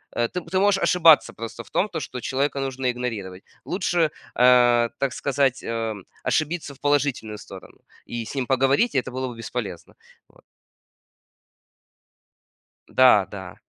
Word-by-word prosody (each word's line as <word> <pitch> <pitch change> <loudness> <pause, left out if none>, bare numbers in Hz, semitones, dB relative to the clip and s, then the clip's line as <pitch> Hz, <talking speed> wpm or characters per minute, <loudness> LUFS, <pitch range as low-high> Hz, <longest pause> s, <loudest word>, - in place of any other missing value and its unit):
э, 120 0 0
ты 180 - -2
ты 185 - +2
можешь 195 0 +3
ошибаться 160 -9 +5
просто 115 +2 -7
в - - -20
том, 210 - 0
то, 165 -4 -4
что 125 -2 -6
человека 140 +2 -1
нужно 135 -1 -3
игнорировать. 110 -7 -5 0.2
Лучше, 175 -3 0 0.3
а, 120 -1 +5
так 135 -2 0
сказать, 140 -2 0
а, 115 -1 -2 0.3
ошибиться 155 -1 -1
в 135 - -20
положительную 140 -7 0
сторону 95 -3 -12 0.3
и 120 -1 -4
с - - -8
ним 130 -2 -1
поговорить, 135 - +2
и 130 - +5
это 125 - -9
было 130 +1 -3
бы 120 - -7
бесполезно. 110 -6 -6 0.4
Вот. - - -24 2.5
Да 125 -7 +5
да. 95 -3 -8
130 Hz, 150 wpm, -23 LUFS, 115-145 Hz, 2.5 s, ошибаться